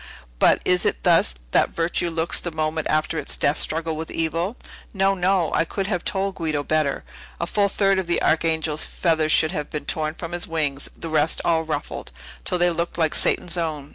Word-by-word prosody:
But, - - +4
is 180 0 +3
it - - 0
thus - - +4 0.2
that - - +3
virtue 170 +1 -1
looks 165 0 +1
the 175 - -4
moment 155 -1 -2
after 155 +1 +1
its 145 - 0
death 140 +1 +2
struggle 160 0 0
with 160 +1 -5
evil? 165 +7 -2 0.4
No, 195 0 +3
no; 185 -2 +1
I - - +3
could 195 +4 -3
have 180 -3 -2
told 195 0 -1
Guido 155 -5 -2
better. 155 -1 0 0.4
A 170 - 0
full 200 +3 +1
third 195 -1 +2
of 185 - -3
the 175 - +1
Archangel's 160 -1 +1
feathers 160 -3 0
should 155 +1 +3
have 150 -5 -4
been 150 - -5
torn 155 0 -2
from 165 0 -7
his 175 0 -3
wings; 145 -4 -2
the - - -6
rest 155 0 +3
all 165 -1 +3
ruffled, 160 -1 -5 0.3
till - - 0
they 175 0 +3
looked 170 +1 -3
like 160 -2 +1
Satan's 175 0 0
own! 150 -4 -3
165 Hz, 200 wpm, -23 LUFS, 155-175 Hz, 0.4 s, But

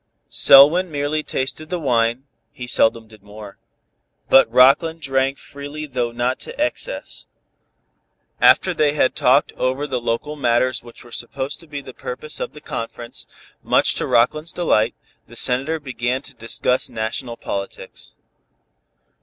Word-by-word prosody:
Selwyn 150 +7 +7
merely 145 +1 -1
tasted 155 +2 -4
the 180 - -2
wine 120 -4 +1 0.3
(he 125 -4 -8
seldom 115 -2 +1
did 110 -2 -17
more) 105 0 -12 0.7
but 135 - +6
Rockland 160 +6 +4
drank 135 -2 0
freely 145 +2 -8
though 125 -4 -2
not 120 +2 -1
to - - -7
excess. 310 +11 -4 1.1
After 185 - +5
they 150 -3 +2
had 150 - +1
talked - - +3
over 130 +3 -1
the 130 -4 -3
local 120 +6 -2
matters 125 -2 +1
which 120 0 -14
were 120 - -16
supposed 130 +5 -4
to 165 - -16
be 145 -2 -6
the 130 - -11
purpose 140 +6 -7
of - - -4
the 150 - -12
conference, 120 -3 -6 0.3
much - - +3
to - - -2
Rockland's 155 +7 +1
delight, 115 -10 +1 0.3
the 120 - -14
Senator 135 +7 0
began 130 -1 -3
to 135 - -9
discuss 125 +2 0
national 115 +1 -4
politics. 100 0 -7
130 Hz, 145 wpm, -20 LUFS, 120-150 Hz, 1.1 s, Selwyn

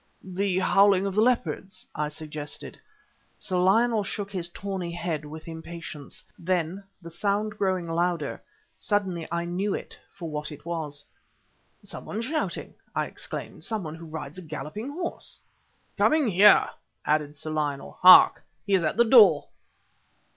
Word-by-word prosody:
"The 190 0 -1
howling 195 +1 +4
of 195 - -2
the 215 - +3
leopards!" 200 -5 0
I 150 0 -1
suggested. 150 -1 -7 0.6
Sir 185 - -2
Lionel 220 +4 +3
shook 200 +1 -5
his 175 -3 -3
tawny 190 -2 -4
head 170 -3 -3
with 155 +2 -9
impatience. 160 -2 -8 0.2
Then, 180 +2 -1 0.2
the 170 - -8
sound 205 +4 -1
growing 190 -4 0
louder, 170 -2 -1 0.3
suddenly 190 -6 -1
I 170 0 -1
knew 190 +4 -1
it - - -8
for 180 -4 -8
what 150 0 -4
it 150 - -11
was. 155 -4 -4 0.8
"Some - - -6
one 210 - -4
shouting!" 300 +6 -3 0.2
I - - +1
exclaimed - - -7
"some 220 -3 -2
one 155 -2 -6
who 165 0 -10
rides 155 +1 -6
a - - -8
galloping 165 - -6
horse!" 340 +4 -4 0.6
"Coming 305 -5 +4
here!" 205 +2 +6 0.3
added 150 -1 0
Sir 155 +1 -4
Lionel. 145 -3 -3
"Hark! 185 0 +9 0.2
he 200 - -1
is 185 -3 +4
at 155 - 0
the 235 - +6
door!" 210 - +7
180 Hz, 150 wpm, -26 LUFS, 155-200 Hz, 0.8 s, Hark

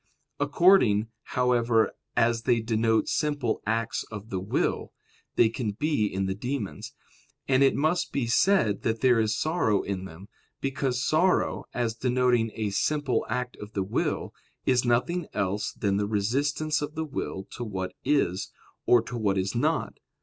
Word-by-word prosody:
According, 120 - +4 0.3
however, 120 -3 +3 0.3
as 115 0 +3
they 120 0 +2
denote 110 0 +1
simple 145 -7 -1
acts 115 0 -1
of 105 0 -8
the 95 - -1
will, 95 +3 -1 0.4
they 115 - +5
can 115 -2 -3
be 145 -3 0
in 95 -1 -2
the 95 - -1
demons. 120 +2 -5 0.5
And 130 -1 +3
it 135 - +5
must 155 +5 0
be 135 -4 -1
said 115 - +3
that 115 -1 -1
there 125 -3 +4
is 110 0 +1
sorrow 155 - +1
in 95 -2 -4
them; 95 +3 -11 0.3
because 135 -2 -1
sorrow, 175 +4 +2
as 120 -2 -1
denoting 125 -1 +1
a 105 -2 -2
simple 145 +8 0
act 125 -1 -2
of 105 +1 -10
the 100 - 0
will, 95 - -2 0.3
is 125 -2 +3
nothing 140 +8 +1
else 100 0 -1
than 100 -2 0
the 100 0 0
resistance 140 +9 0
of 145 +2 -5
the 160 0 -2
will 135 -9 -4
to 120 - -6
what 95 -4 -4
is, 125 -10 0 0.4
or 120 -2 +5
to 120 - -7
what 100 -4 0
is 95 +1 -1
not. 150 +7 -1
115 Hz, 160 wpm, -27 LUFS, 105-135 Hz, 0.5 s, they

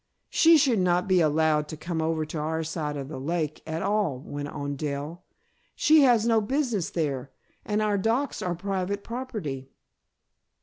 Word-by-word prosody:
"She 330 0 +6
should 260 -7 +3
not 180 0 +2
be 185 -2 +4
allowed 155 -1 +2
to 155 - -7
come 165 +1 -3
over 160 -1 0
to 155 +1 -5
our 160 +2 -1
side 155 -2 -3
of 135 -1 -5
the 135 -2 -6
lake 155 +1 -2
at 160 +2 -3
all," 200 -8 +1
went 145 0 -5
on 145 0 -4
Dell. 150 +4 -4 0.5
"She 310 0 +5
has 240 -5 +5
no 225 -2 +3
business 235 - -1
there 140 -8 -2 0.3
and 210 0 0
our 205 -1 +1
docks 235 +7 0
are 180 -1 -1
private 195 +2 -3
property." 210 - -5
170 Hz, 170 wpm, -26 LUFS, 150-210 Hz, 0.5 s, She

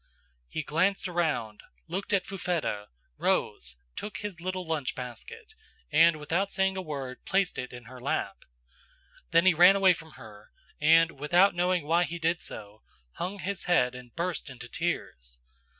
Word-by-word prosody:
"He 155 - -3
glanced 185 +7 +1
around, 160 -12 -1 0.3
looked 185 +4 -4
at 195 -2 +2
Fufetta, 170 - -2 0.3
rose, 60 0 0 0.2
took 210 - -5
his 200 -5 -6
little 185 0 -3
lunch 155 -5 -2
basket, 420 - -8 0.4
and 165 +2 +6
without 165 +6 -1
saying 190 0 +1
a 190 - -2
word 140 -6 -6
placed 195 -1 +1
it 125 - -5
in 120 -1 -9
her 125 +2 -12
lap. - - -1 0.9
"Then 165 +2 +4
he 185 - +7
ran 180 +4 +7
away 195 -2 +6
from 160 -2 -11
her, 105 -5 -13 0.3
and, 165 -1 +4
without 175 +7 +4
knowing 175 -2 +1
why 170 +3 +3
he 170 - -5
did 165 +1 0
so, 105 0 -9 0.4
hung 190 +3 -3
his 200 0 -3
head 130 -9 +3
and 125 -2 -12
burst 170 -2 -3
into 125 -2 -9
tears. 60 - -4
165 Hz, 160 wpm, -28 LUFS, 130-185 Hz, 0.9 s, he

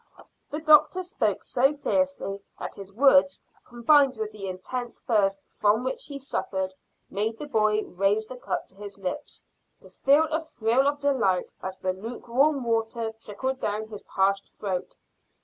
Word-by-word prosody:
The 300 - -3
doctor 315 +4 +5
spoke 355 - -1
so 270 +3 +2
fiercely 280 -9 -1 0.2
that - - -6
his 195 -1 -10
words, 275 +5 +4 0.2
combined 260 +2 +4
with 215 -1 -3
the 205 -2 -7
intense 240 +7 -5
thirst 195 -4 +1
from 215 +3 +3
which 260 - -3
he 280 - -5
suffered, 190 -8 -3 0.4
made 215 +3 -1
the 300 - -6
boy 215 -5 +2
raise 200 +4 +1
the 255 - -9
cup - - -3
to 190 - -13
his 205 -1 -9
lips, 185 -2 -6 0.4
to - - -16
feel 285 +4 +4
a 315 +1 +1
thrill 255 -3 +1
of 285 0 0
delight 235 -11 +1
as 190 0 -5
the 185 0 -1
lukewarm 245 +7 0
water 225 0 -1
trickled 260 +5 -3
down 215 -1 -2
his 210 -2 -8
parched 195 +1 0
throat. 190 -3 -4
225 Hz, 160 wpm, -26 LUFS, 200-275 Hz, 0.4 s, doctor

